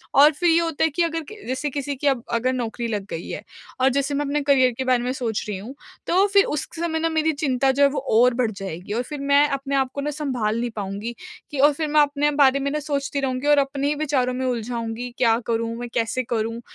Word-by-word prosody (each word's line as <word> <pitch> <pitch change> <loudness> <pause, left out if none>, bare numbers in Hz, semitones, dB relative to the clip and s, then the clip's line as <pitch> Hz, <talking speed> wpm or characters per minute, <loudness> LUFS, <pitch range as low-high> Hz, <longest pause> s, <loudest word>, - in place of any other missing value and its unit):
और 290 +3 +8
फिर 345 +4 +1
ये 330 +1 +5
होता 330 -3 -1
है 320 - +4
कि 340 +4 0
अगर 330 0 -1
के 430 - -9
जैसे 260 +4 -2
किसी 280 0 -3
की 285 +2 -2
अब 255 -4 +1
अगर 255 +3 +1
नौकरी 235 -1 -3
लग 210 -3 -3
गई 165 - -6
है - - -5 0.4
और 265 - +5
जैसे 280 +1 0
मैं 290 +1 0
अपने 290 +1 0
करियर 265 -3 +4
के 260 - -1
बारे 250 -1 +2
मैं 250 - -1
सोच 230 -5 -2
रही 205 -2 -3
हूँ, 225 +8 -8 0.3
तो 380 +3 +4
फिर 400 0 +6
उस 300 - -2
क - - -17
समय 320 -2 -1
ना 330 +1 +1
मेरी 320 0 +1
चिंता 270 -2 +1
जो 280 +2 +2
है 280 - +6
वो 280 0 -2 0.2
और 250 0 +5
बढ़ 235 -2 0
जाएगी 195 -1 -6
और 235 - 0
फिर 295 +2 -7
मैं 280 +1 +4
अपने 275 0 -2
आपको 270 +1 -1
ना 295 - -2
सँभाल 250 -7 -2
नहीं 240 0 -1
पाऊँगी 205 +3 -4 0.4
कि 285 - -4
और 290 +1 +6
फिर 310 +2 -2
मैं 300 0 +4
अपने 290 0 +1
बारे 275 -1 +4
में 280 +1 -1
ना 300 - -1
सोचती 280 -1 -2
रहूँगी 260 +1 -2
और 295 -1 +5
अपने 275 0 -1
ही 295 - +1
विचारों 275 -4 0
में 260 +1 -2
उलझाऊँगी, 235 0 -3
क्या 230 -3 +3
करूँ, 230 0 -1
मैं 240 0 -6
कैसे 255 +3 0
करूँ? 230 0 -2
270 Hz, 260 wpm, -23 LUFS, 240-290 Hz, 0.4 s, और